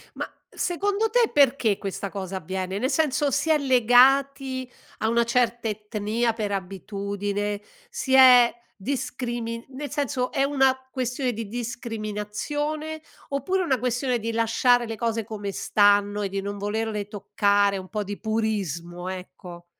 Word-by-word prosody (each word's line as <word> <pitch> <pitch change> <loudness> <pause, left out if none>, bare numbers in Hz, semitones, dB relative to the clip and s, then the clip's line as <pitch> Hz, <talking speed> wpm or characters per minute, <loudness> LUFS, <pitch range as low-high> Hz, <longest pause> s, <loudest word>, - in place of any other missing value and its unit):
Ma, - - -4 0.2
secondo 405 +5 0
te, 475 0 +3
perché 265 -8 +3
questa 195 0 -4
cosa 190 -1 -5
avviene? 185 +2 -4
Nel 260 - 0
senso, 290 -1 +1
si 290 +4 0
è 310 - +5
legati 260 +1 +3 0.3
a 220 - +1
una 235 0 +3
certa 235 -1 +1
etnia 215 +2 -1
per 210 -3 -3
abitudine? 200 +1 -3 0.3
Si 265 - -3
è 250 -2 +8 0.3
discrimin 240 -2 -3
nel 280 +2 -6
senso, 270 -4 -1
è 275 -2 +1
una 270 -2 +3
questione 255 -1 -2
di 225 -1 -5
discriminazione, 240 +7 -4 0.3
oppure 365 +8 0
una 265 -6 +1
questione 245 +1 0
di 230 +1 -3
lasciare 230 +2 +3
le 225 - -4
cose 225 0 -1
come 205 -3 -5
stanno, 205 +1 +3
e 200 - -1
di 195 0 -3
non 200 +1 -5
volerle 210 0 -2
toccare, 200 -1 +1
un 185 -1 -8
po' 210 -1 -2
di 205 +1 -6
purismo, 185 -6 -2
ecco. 180 -1 -9
230 Hz, 140 wpm, -25 LUFS, 205-260 Hz, 0.3 s, è